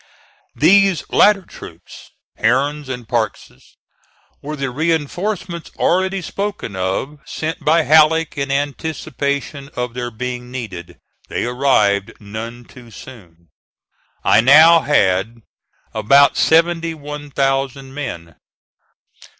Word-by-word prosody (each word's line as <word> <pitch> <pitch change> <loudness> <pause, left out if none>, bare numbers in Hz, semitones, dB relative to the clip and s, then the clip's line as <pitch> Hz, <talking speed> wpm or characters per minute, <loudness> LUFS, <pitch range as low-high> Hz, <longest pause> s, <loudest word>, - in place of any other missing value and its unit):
These 185 +4 +4
latter 205 -2 +4
troops - - -13 0.3
Herron's 140 +5 0
and 125 -3 -6
Parke's 110 - -4 0.7
were 150 +2 -5
the 135 -3 -3
reinforcements 170 +4 -2
already 190 +1 0
spoken 200 - -5
of 95 +11 -3
sent 160 +3 -5
by 160 +2 +3
Halleck 160 +1 +4
in 140 -1 -3
anticipation 140 -1 -3
of 125 -1 -3
their 120 0 -4
being 125 +1 -6
needed. 110 -9 -8 0.3
They - - -2
arrived 120 -6 +1
none 115 +3 -8
too 125 -2 -15
soon. 90 - -14 0.7
I 105 - +5
now 155 +7 +7
had 110 - 0 0.5
about 135 +6 +4
seventy 165 0 +2
one 150 0 -8
thousand 135 -1 -1
men. 85 - -7
140 Hz, 105 wpm, -18 LUFS, 120-160 Hz, 0.7 s, now